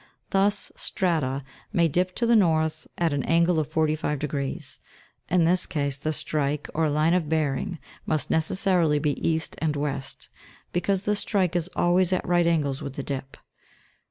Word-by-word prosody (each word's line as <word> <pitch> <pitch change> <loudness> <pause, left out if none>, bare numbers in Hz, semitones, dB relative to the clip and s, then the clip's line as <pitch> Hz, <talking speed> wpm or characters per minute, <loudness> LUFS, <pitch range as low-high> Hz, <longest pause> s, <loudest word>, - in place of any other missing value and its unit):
Thus, 200 +1 +1
strata 145 -7 -1 0.3
may 170 -5 +3
dip 180 +4 0
to 235 - 0
the 235 0 +4
north 160 -5 +2
at 165 -3 +1
an 140 - 0
angle 170 +2 +3
of 155 - -1
forty 155 -1 +1
five 150 -1 -2
degrees; 140 -1 -4 0.5
in 180 -1 +3
this 180 +2 +2
case, 140 -4 -2
the 155 +2 -1
strike, 150 -1 -2
or 160 -1 +1
line 155 +3 +2
of 175 -5 +1
bearing, 155 +1 0 0.3
must 155 -2 -1
necessarily 165 -1 +2
be 150 0 +1 0.2
east 160 -1 -1
and 155 -2 0
west, 140 -2 -4 0.5
because 190 +2 0
the 210 - +2
strike 190 -4 0
is 175 0 0
always 175 +1 +3
at 185 - 0
right 175 -1 +3
angles 145 -5 +1
with 140 -3 -5
the 140 - -4
dip. 135 -1 -5
160 Hz, 170 wpm, -26 LUFS, 150-180 Hz, 0.5 s, the